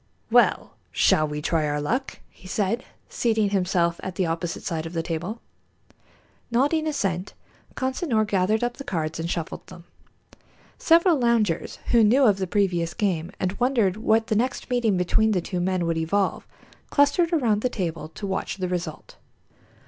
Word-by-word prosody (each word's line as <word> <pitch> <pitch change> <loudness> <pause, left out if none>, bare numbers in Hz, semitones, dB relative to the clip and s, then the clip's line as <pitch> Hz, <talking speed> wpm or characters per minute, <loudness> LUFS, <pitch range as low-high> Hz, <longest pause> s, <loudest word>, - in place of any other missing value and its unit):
"Well, - - +3
shall 155 0 +3
we 150 0 -5
try 160 -2 +1
our 145 0 -1
luck?" 250 - -2
he 185 - -15
said, 205 +5 -1 0.2
seating 220 -4 0
himself 180 -3 +1
at 185 -1 -6
the 185 - 0
opposite 165 0 -3
side 165 -1 -3
of 165 - -9
the 165 -1 -1
table. 175 +8 -4 1.1
Nodding 290 +7 +1
assent, 195 - -2 0.4
Consinor 260 -4 0
gathered 210 +2 +1
up 240 0 -2
the - - -7
cards 160 - -3
and 165 +1 -3
shuffled 170 -2 -4
them. 170 - -12 1.0
Several 335 -1 +4
loungers 230 -8 +1
who 235 -2 +6
knew 245 +6 +4
of 205 -6 +4
the 190 - -1
previous 175 -4 0
game 180 -7 -1
and 185 - 0
wondered 240 -7 +2
what 220 0 +2
the 220 - -1
next 250 +3 -1
meeting 230 -6 +2
between 215 +5 +2
the 185 - +2
two 180 +1 -4
men 180 0 0
would 165 -1 0
evolve, 190 +5 -1 0.4
clustered 285 +4 +3
around 235 -11 +2
the 250 - +1
table 165 -8 -4
to 200 - -8
watch 195 0 -3
the 185 -1 -2
result. 175 -3 -5
195 Hz, 165 wpm, -24 LUFS, 170-235 Hz, 1.1 s, who